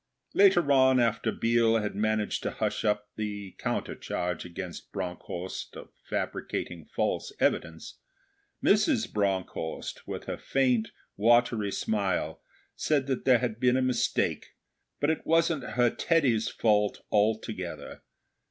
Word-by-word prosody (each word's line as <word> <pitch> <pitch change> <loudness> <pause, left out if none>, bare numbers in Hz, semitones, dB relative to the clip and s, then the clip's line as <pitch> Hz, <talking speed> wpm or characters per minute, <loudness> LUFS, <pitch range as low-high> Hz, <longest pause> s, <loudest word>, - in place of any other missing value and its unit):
Later 185 -7 +5
on, 130 -1 +5
after 115 -2 +1
Biel 115 0 +3
had 105 -1 -2
managed 110 0 0
to - - -2
hush - - -2
up 105 -1 0
the 105 -2 -4
counter - - -2
charge 90 -1 -3
against 90 0 -7
Bronckhorst 90 -1 -5
of - - -10 0.2
fabricating 85 -3 -3
false - - -2
evidence, 80 -1 -1 0.6
Mrs. 220 +4 +3
Bronckhorst, 95 -5 -2
with - - -5
her - - -4
faint, 125 -4 +1 0.3
watery 115 -1 +3
smile, 95 -8 -1 0.3
said 145 -3 +1
that 130 -2 -2
there 130 -2 +6
had 115 -2 -3
been 125 0 +3
a - - +2
mistake, 130 -1 0 0.4
but 145 +2 +2
it 160 - -3
wasn't 165 -2 +2
her 120 -1 +4
Teddy's 130 -10 +2
fault 105 -2 +1
altogether. 105 -3 -1
110 Hz, 125 wpm, -28 LUFS, 100-130 Hz, 0.6 s, there